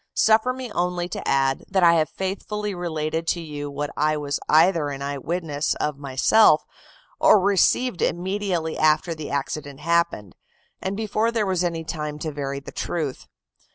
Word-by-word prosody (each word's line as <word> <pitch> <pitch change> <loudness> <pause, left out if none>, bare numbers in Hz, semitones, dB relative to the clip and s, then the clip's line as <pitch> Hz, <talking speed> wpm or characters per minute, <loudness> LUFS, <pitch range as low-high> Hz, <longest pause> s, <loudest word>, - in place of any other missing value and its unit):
Suffer 220 +3 +4
me 255 -2 -6
only 175 -1 -1
to - - -5
add, 135 0 +1
that 190 -2 +2
I 170 -1 +7
have 160 -2 +2
faithfully 205 +2 -4
related 165 -2 -3
to 170 - +1
you 145 -3 -6
what 145 +1 -4
I 155 +1 +1
was 145 -1 -2
either 160 -1 +4
an 140 -1 -5
eye 140 0 -3
witness 155 -1 -2
of 150 -2 -3
myself, 145 +6 +4 0.5
or 215 - +6
received 200 +3 +2
immediately 180 -2 -1
after 155 +2 +3
the 155 -2 -7
accident 140 0 -4
happened, 170 - 0 0.5
and 195 +1 -3
before 220 +1 0
there 225 -3 0
was 185 -2 0
any 165 -2 -2
time 150 -2 -4
to 155 +1 -4
vary 140 -1 -4
the 140 - -10
truth. 155 -6 -4
165 Hz, 165 wpm, -23 LUFS, 145-190 Hz, 0.5 s, I